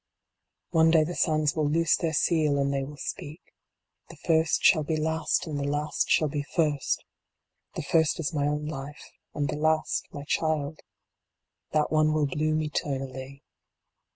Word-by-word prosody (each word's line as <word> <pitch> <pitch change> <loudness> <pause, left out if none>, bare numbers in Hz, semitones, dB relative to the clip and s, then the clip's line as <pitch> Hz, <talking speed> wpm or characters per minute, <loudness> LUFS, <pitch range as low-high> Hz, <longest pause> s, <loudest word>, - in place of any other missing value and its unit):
One 160 -1 +5
day 160 -1 +5
the 170 +3 -4
sands 155 -3 +1
will 155 -2 +1
loose 165 +2 +3
their 165 -2 -2
seal, 155 -3 +2
and 140 0 +1
they 135 0 -1
will 145 +2 -8
speak. 150 +2 -6 0.7
The - - -11
first 160 -1 +1
shall 155 - +6
be 155 +1 -1
last 160 +1 0
and 150 -3 -4
the - - -2
last 145 +2 -1
shall 155 - +4
be 145 0 -2
first 150 -1 -1 0.7
The - - -3
first 160 -1 +2
is 155 -2 -2
my 145 -1 0
own 150 0 -1
life 145 -1 -7 0.2
and 145 -1 0
the 150 - -3
last 155 +1 0
my 145 - -7
child. 155 0 -1 0.9
That 150 -1 +1
one 155 0 +3
will 155 -1 +2
bloom 155 +3 0
eternally. 135 -2 -4
150 Hz, 165 wpm, -27 LUFS, 145-160 Hz, 0.9 s, shall